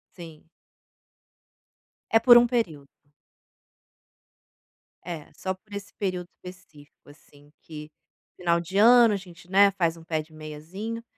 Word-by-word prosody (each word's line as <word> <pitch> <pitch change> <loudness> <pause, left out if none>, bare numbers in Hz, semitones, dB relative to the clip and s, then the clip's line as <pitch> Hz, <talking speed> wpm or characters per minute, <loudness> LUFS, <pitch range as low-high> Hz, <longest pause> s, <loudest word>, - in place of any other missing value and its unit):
Sim. 165 -4 -12 1.7
É 225 - +5
por 240 +1 +7
um 240 - +5
período. 175 - -3 2.1
É, 170 -4 -8
só 190 - -4
por 205 +2 -19
esse 200 0 -8
período 185 -3 -4 0.2
específico, 155 -6 -15
assim, 145 0 -20
que 150 -1 -10 0.5
final 170 -1 +1
de 175 +3 -5
ano, 235 +1 +6
a - - -1
gente, 180 -2 -15
né, 200 +1 +5
faz 170 -4 -1
um 165 - -14
pé 160 -1 -2
de 155 +1 -18
meiazinho. 165 +10 -8
180 Hz, 130 wpm, -25 LUFS, 155-200 Hz, 2.1 s, por